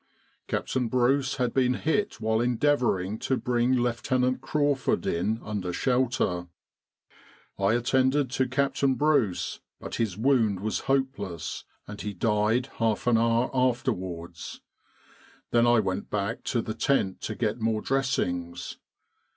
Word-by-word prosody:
Captain 125 -2 -1
Bruce 130 +3 +2
had 125 -3 -1
been 125 -1 +2
hit 160 - -1
while 110 +1 +1
endeavouring 120 -6 +1
to 130 - 0
bring 125 +1 +1
Lieutenant 125 +1 +1
Crawford 145 0 0
in 100 +7 0
under 100 -4 -3
shelter. 125 -6 0 1.1
I 100 +2 +3
attended 130 +2 +2
to 130 0 +1
Captain 135 0 +1
Bruce, 140 -10 +1 0.2
but - - -6
his 105 -5 -1
wound 115 -5 +2
was 110 +1 -1
hopeless, 130 - -2 0.2
and 105 -1 -7
he 105 -1 -4
died 105 +4 +1
half 110 -2 0
an 120 -2 +4
hour 115 +2 +2
afterwards. 95 -10 -2 0.9
Then 120 0 +4
I 120 -1 +5
went 95 -1 -2
back 105 +2 -2
to 120 -2 0
the 110 - -4
tent 105 -7 0
to 110 - -4
get 110 +1 -1
more 110 -1 0
dressings. 90 -11 -2
120 Hz, 130 wpm, -27 LUFS, 105-130 Hz, 1.1 s, I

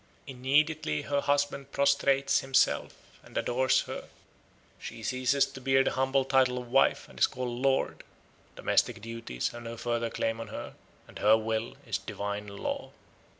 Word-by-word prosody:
Immediately 135 - +1
her 140 -1 0
husband 140 -1 0
prostrates 140 -1 +3
himself 135 0 +2 0.3
and - - -10
adores 130 +2 +2
her; - - -7 0.7
she 115 - -8
ceases 130 +3 +2
to 135 - -10
bear 135 +1 +4
the - - 0
humble 135 0 +1
title 130 -2 +3
of 125 -1 -7
wife 135 - +3
and - - -13
is - - +6
called 125 -1 -4
"Lord"; 135 0 +1 0.5
domestic 115 -2 +1
duties 115 - -4
have 120 - -9
no 115 0 -7
further 120 0 -1
claim 115 0 -2
on 115 - -6
her, - - -7 0.3
and - - -11
her 110 +2 +6
will 110 +1 -3
is - - -2
a - - -22
divine 100 +1 -4
law. 100 0 -4
130 Hz, 160 wpm, -29 LUFS, 115-135 Hz, 0.7 s, is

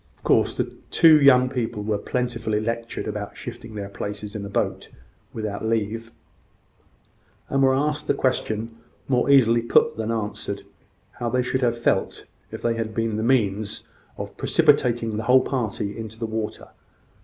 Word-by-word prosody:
Of - - -32
course, - - +3
the - - -2 0.2
two 155 -2 +6
young 130 -2 +6
people 120 -5 -3
were 105 -1 -1
plentifully 115 -3 -1
lectured 115 +1 -3
about 105 -1 -5
shifting 110 -1 -8
their 100 -1 -4
places 105 +1 -6
in 105 - -4
a 100 - -6
boat - - -2 0.4
without 105 -2 -4
leave, 115 +1 -1 1.4
and 135 - +1
were 130 -1 +4
asked 150 +2 -1
the - - +2
question, 115 -3 -1 0.3
more 125 0 +1
easily 120 -4 +5
put 115 - +3
than 110 0 -3
answered, 110 -2 -3 0.6
how 120 - -1
they 125 +1 +1
should 130 +1 -1
have 120 -2 +1
felt 120 - 0 0.3
if - - -8
they 115 - +2
had 115 -1 -4
been 115 -1 0
the 110 - -1
means 110 -4 0 0.3
of - - -6
precipitating 115 -3 +2
the 110 - -2
whole 130 +1 +6
party 105 -5 -2
into 110 -1 -7
the 115 - -3
water. 110 -1 -4
115 Hz, 165 wpm, -24 LUFS, 110-125 Hz, 1.4 s, two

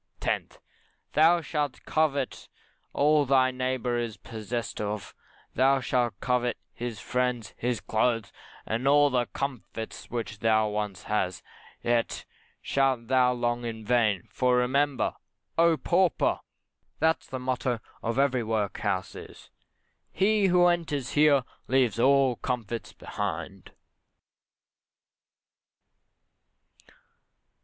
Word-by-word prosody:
10th, - - -2 0.6
Thou 165 +3 +5
shalt 150 -4 -3
covet 145 -4 -1 0.4
all 150 +1 +3
thy 130 -1 +3
neighbour 130 -1 -1
is 115 -3 -4
possessed 115 +1 -5
of, 105 -1 -4 0.4
thou 135 +2 +4
shalt 120 -5 0
covet 125 -2 0 0.2
his 120 -3 -5
friends, 125 -1 -1
his 120 -1 -1
clothes, 115 0 0 0.3
and 115 +5 -1
all 145 0 +5
the 125 -2 +1
comforts 125 -5 -6
which 110 -3 -4
thou 110 -1 +3
once 105 -3 -3
had; 95 -4 0 0.5
yet 120 -1 0 0.4
shalt 130 -4 +1
thou 130 -1 +4
long 120 -1 -1
in 110 -2 -5
vain; 110 -6 +2
for 125 -1 +2
remember, 135 +2 +1 0.4
oh, 165 -1 +4
pauper! 180 +2 +2 0.6
that 160 +1 +2
the 130 - -4
motto 125 -1 -1 0.2
of 115 +2 -2
every 135 -2 +2
workhouse 105 -3 -1
is - - -12 0.6
"He 200 +2 +3
who 180 -1 +5
enters 160 -7 0
here 145 -3 +4 0.2
leaves 125 -4 +2
all 135 -1 +4
comforts 120 -3 -4
behind." 95 -1 -5
125 Hz, 110 wpm, -27 LUFS, 115-140 Hz, 0.6 s, Thou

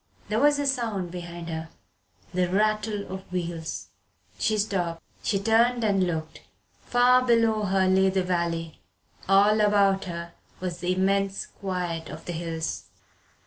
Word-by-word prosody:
There 215 +1 +1
was 290 +1 +4
a 285 - -1
sound 225 -10 -1
behind 175 -1 -7
her. 160 0 -5 0.6
The 180 0 +1
rattle 215 +1 0
of 190 -1 -8
wheels. 170 -3 -4 0.5
She 215 - +1
stopped. 175 -5 -1 0.2
She 205 - 0
turned 230 +4 +3
and 195 -4 +2
looked. 160 -2 -4 0.4
Far 250 +1 +4
below 230 -3 +3
her 190 -1 +2
lay 190 +1 +4
the 190 0 +1
valley 170 -2 -2 0.5
all 205 +2 +5
about 200 -2 +3
her 170 -1 -6 0.3
was 180 -2 -4
the 180 +1 0
immense 195 +1 +1
quiet 175 -4 -4
of 155 +2 -9
the 175 - -4
hills. 165 -1 -4
190 Hz, 145 wpm, -26 LUFS, 170-215 Hz, 0.6 s, all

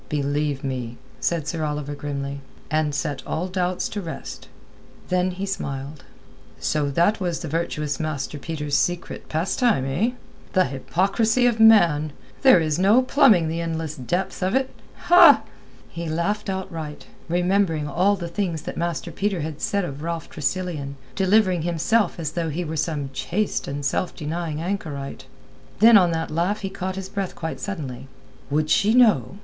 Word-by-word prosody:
"Believe 145 -1 -1
me," 125 -3 -4 0.2
said 165 -3 -1
Sir 165 -1 -2
Oliver 150 -1 -3
grimly. 140 -1 -4 0.3
"And 155 -2 +1
set 140 -1 -2
all 175 +3 -2
doubts 180 -1 -1
to 205 - -4
rest." 165 -3 -7 0.6
Then 180 0 +2
he 190 +2 -4
smiled. 140 -6 -5 0.6
"So 150 -2 0
that 175 +10 +2
was 175 -3 -2
the 165 - -4
virtuous 150 -2 -2
Master 150 -2 -3
Peter's 150 -2 -3
secret 175 0 -1
pastime, 170 - +1
eh? 185 - 0 0.4
The 185 -2 +4
hypocrisy 195 - +1
of 235 -2 +2
man! 170 -10 +5 0.3
There 260 -9 +7
is 155 0 0
no 210 +7 +5
plumbing 220 - +5
the 165 +1 -2
endless 160 -2 -3
depths 175 +10 -3
of 185 +4 +1
it!" 265 0 +1 1.2
He 170 -1 -5
laughed 195 +6 -1
outright, 165 -6 -5 0.2
remembering 175 -3 +1
all 185 +8 +2
the 175 -3 -5
things 170 -3 -2
that - - -6
Master 170 0 -2
Peter 195 -1 -1
had 155 0 -5
said 200 -2 0
of 140 -2 -7
Ralph 165 0 -4
Tressilian—delivering 175 +4 0
himself 175 +5 +1
as 155 -2 -2
though 165 0 -2
he 170 +4 -3
were 160 +1 -4
some 150 -3 -2
chaste 185 +10 -2
and 140 0 -4
self 175 +6 -1
denying 155 0 -3
anchorite. 150 -8 -4 0.5
Then 225 +2 +7
on 180 -4 +6
that 160 -1 -2
laugh 175 +7 0
he 195 -1 -4
caught 190 -1 -4
his 195 -1 -5
breath 195 -1 -4
quite 160 -1 -5
suddenly. 140 -10 -5 0.4
"Would 155 +1 0
she 215 +4 +4
know?" 200 - +4
165 Hz, 155 wpm, -23 LUFS, 150-190 Hz, 1.2 s, There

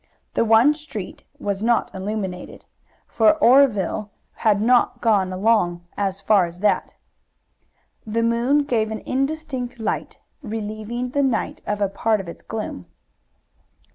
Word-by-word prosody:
The - - +2
one 230 +6 +5
street 295 -11 -8
was 200 -1 -3
not 235 +1 +1
illuminated, 190 -2 -5 0.4
for 220 +5 +4
Oreville 235 - +3 0.3
had 210 -2 +2
not 245 +3 +3
got 205 -5 +2
along 185 -3 +1
as 195 -1 -2
far 195 -3 +3
as 170 +2 -11
that. 210 - +1 1.1
The 225 +1 -1
moon 240 +5 +2
gave 230 -6 0
an 220 0 -5
indistinct 270 -3 -2
light, 220 - -3 0.2
relieving 220 +1 -4
the 285 - +1
night 260 -5 -1
of 210 0 -2
a 200 - +3
part 215 +2 0
of 195 - -7
its 170 - -9
gloom. 215 - -6
220 Hz, 135 wpm, -22 LUFS, 200-245 Hz, 1.1 s, one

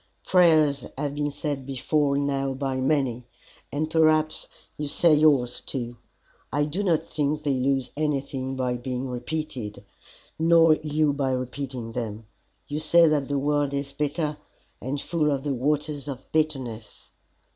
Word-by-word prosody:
Prayers 155 -7 +4
have 145 0 -2
been 145 0 -1
said 145 -1 -4
before 140 +2 0
now 135 -1 0
by 135 -1 -2
many, 130 -3 0 0.4
and 150 +2 -1
perhaps 155 -1 +3 0.3
you 150 - -4
say 160 +3 +4
yours, 145 -5 +3
too. 120 -3 -4 0.6
I 145 +2 +1
do 160 +7 -2
not 170 -5 +2
think 150 0 -1
they 145 -2 +1
lose 130 -1 0
anything 135 -3 -2
by 125 -1 -1
being 125 +1 -4
repeated, 125 -4 -5 0.5
nor 165 0 +6
you 150 -1 +1
by 140 -1 0
repeating 130 -2 -4
them. 115 -2 -5 0.4
You 145 +1 -3
say 165 +2 +5
that 145 -3 +1
the 145 - -1
world 145 0 +1
is 140 0 -3
bitter, 150 +1 -1 0.4
and 135 +3 -3
full 155 0 0
of 140 -2 -1
the 145 -2 -1
Waters 145 +2 -1
of 135 -2 -6
Bitterness. 130 -8 -2
140 Hz, 145 wpm, -25 LUFS, 130-150 Hz, 0.6 s, nor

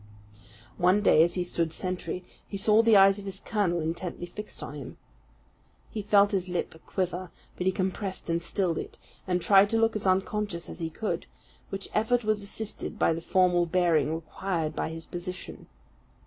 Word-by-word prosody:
One 185 +3 +4
day, 155 - +6
as 170 +1 +3
he 180 - 0
stood 170 -2 -1
sentry, 185 +1 -4 0.2
he 200 - -5
saw 210 +3 +5
the 230 -2 +6
eyes 195 +1 +6
of 200 - -9
his 195 -1 -2
colonel 200 -7 0
intently 170 +2 -3
fixed 210 +4 -7
on - - -6
him. 140 -4 -8 0.9
He 215 - -3
felt 200 0 +4
his 185 -3 -1
lip 175 -1 -2
quiver, 185 -1 -2 0.3
but 180 - -4
he - - +5
compressed 190 +1 -3
and 170 0 0
stilled 175 -1 -1
it, - - -8 0.3
and 180 -2 0
tried 200 0 +6
to 225 - +2
look 225 0 +2
as 205 -2 -1
unconscious 190 -1 0
as - - -8
he 165 -1 -2
could; 215 +7 -3 0.4
which 195 0 -4
effort 235 +3 +2
was 215 -1 +1
assisted 210 +1 -4
by 165 - +3
the 165 - -4
formal 175 -1 +3
bearing 165 -4 +2
required 165 0 -3
by - - -2
his 160 0 -7
position. 180 +1 -7
185 Hz, 180 wpm, -28 LUFS, 170-205 Hz, 0.9 s, day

